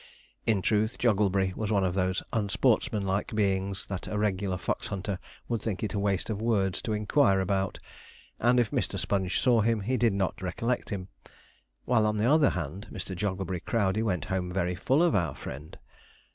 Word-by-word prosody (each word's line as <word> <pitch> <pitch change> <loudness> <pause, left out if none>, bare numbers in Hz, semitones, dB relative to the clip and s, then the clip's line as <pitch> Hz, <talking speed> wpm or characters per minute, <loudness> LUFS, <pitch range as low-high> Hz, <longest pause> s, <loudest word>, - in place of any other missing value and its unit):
In 105 -5 +2
truth, 110 +2 +1
Jogglebury 100 -4 +2
was 110 -1 -2
one 100 -2 +3
of 90 -2 +1
those 95 0 0
unsportsmanlike 105 -2 +1
beings, 100 -1 0
that 95 -2 -5
a 105 - -3
regular 100 -2 0
fox - - -2
hunter 95 0 -3 0.3
would 115 -2 -1
think 105 -3 -3
it 105 - -2
waste 100 0 0
of 105 -1 -3
words 100 -6 +1
to 110 - -2
inquire 105 -1 +3
about, 95 0 0 0.6
and 125 +2 +4
if 115 -3 +1
Mr. - - -1
Sponge 95 -2 0
saw 120 -4 +4
him, 115 0 +1
he 125 +6 0
did 115 -2 +3
not 95 -1 -1
recollect 115 +7 -2
him; 95 -3 -4 0.8
while, 115 -3 +3
on 105 0 0
the 105 - +1
other 145 +2 +5
hand, 90 +4 -4
Mr. 95 - -5
Jogglebury 95 -1 -2
Crowdey 100 +1 0
went 90 -8 -1
home 90 -1 -2
very 90 -1 0
full 135 - +2
of 175 - +3
our 80 -8 +1
friend. 75 +4 -8
100 Hz, 180 wpm, -28 LUFS, 95-110 Hz, 0.8 s, other